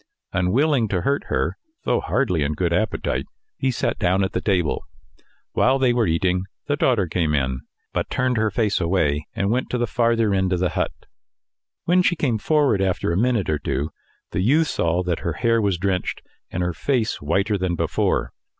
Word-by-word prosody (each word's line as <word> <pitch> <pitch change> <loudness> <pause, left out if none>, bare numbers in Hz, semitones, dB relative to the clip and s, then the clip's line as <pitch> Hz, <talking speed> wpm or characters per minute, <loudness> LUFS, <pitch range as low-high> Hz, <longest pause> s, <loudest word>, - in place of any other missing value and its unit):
Unwilling 115 - +2
to 95 -3 -1
hurt 140 +9 0
her, - - -1 0.3
though - - +1
hardly 105 - 0
in 70 +1 0
good 85 +2 0
appetite, 110 +6 -1 0.3
he 135 - +1
sat 125 - -1
down 95 -1 +2
at 95 - -1
the 90 - -2
table. 90 -7 0 0.7
While 130 +2 +3
they 130 -2 +3
were 120 -4 +2
eating, 90 +3 +1 0.2
the 145 - 0
daughter 120 -8 +2
came 80 -2 0
in, 65 -2 -1 0.3
but - - -1
turned 130 0 0
her 110 0 +2
face 105 -2 0
away 80 -4 +1
and 100 +1 0
went 125 +2 0
to 125 - -1
the 120 - +1
farther 115 -2 +1
end 95 -1 +1
of 90 - 0
the 90 0 +1
hut. - - -1 0.9
When 180 +2 +4
she 180 -1 +2
came 125 -9 0
forward 145 -5 +2
after 95 -3 0
a - - 0
minute 115 -1 +1
or 75 -1 0
two, 75 +1 -2 0.4
the 90 - -1
youth 150 +10 +3
saw 85 +2 0
that 90 -2 -1
her 85 - -2
hair 115 +3 +2
was 100 -4 +1
drenched, 95 0 -2 0.3
and 90 - -2
her 90 0 -1
face 120 - -1
whiter 95 +8 +1
than 95 -2 -1
before. - - 0
95 Hz, 195 wpm, -22 LUFS, 85-120 Hz, 0.9 s, When